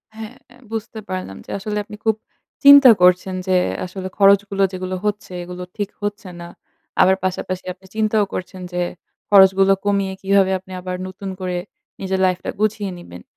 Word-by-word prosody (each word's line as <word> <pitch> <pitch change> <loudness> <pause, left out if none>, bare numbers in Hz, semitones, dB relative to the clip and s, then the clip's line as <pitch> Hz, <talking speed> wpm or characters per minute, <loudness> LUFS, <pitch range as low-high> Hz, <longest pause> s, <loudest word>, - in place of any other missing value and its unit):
হ্যাঁ, 220 +2 -8 0.4
বুঝতে 225 0 -5
পারলাম 185 - -5
যে - - -17
আসলে 210 +2 -4
আপনি 210 - -11
খুব 220 - +3 0.5
চিন্তা 280 -2 +10
করছেন 180 +1 +4
যে 185 -1 +3 0.3
আসলে 185 +1 -6
খরচগুলো 200 0 +4
যেগুলো 185 0 -4
হচ্ছে, 210 -2 -3
এগুলো 180 +1 -7
ঠিক 205 -2 -2
হচ্ছে 205 -1 -4
না। 170 - -8 0.5
আবার 190 +1 +5
পাশাপাশি 185 0 -3
আপনি 190 +1 -23
চিন্তাও 215 -1 +2
করছেন 185 0 -6
যে, 180 - -1 0.5
খরচগুলো 195 -1 +6
কমিয়ে 200 -1 0
কিভাবে 195 0 +3
আপনি 185 0 -17
আবার 185 0 -4
নতুন 190 +1 -7
করে 180 -1 -3 0.4
নিজের 190 0 -1
লাইফটা 185 -1 -1
গুছিয়ে 210 -2 0
নিবেন। 90 - -11
190 Hz, 155 wpm, -20 LUFS, 185-205 Hz, 0.5 s, চিন্তা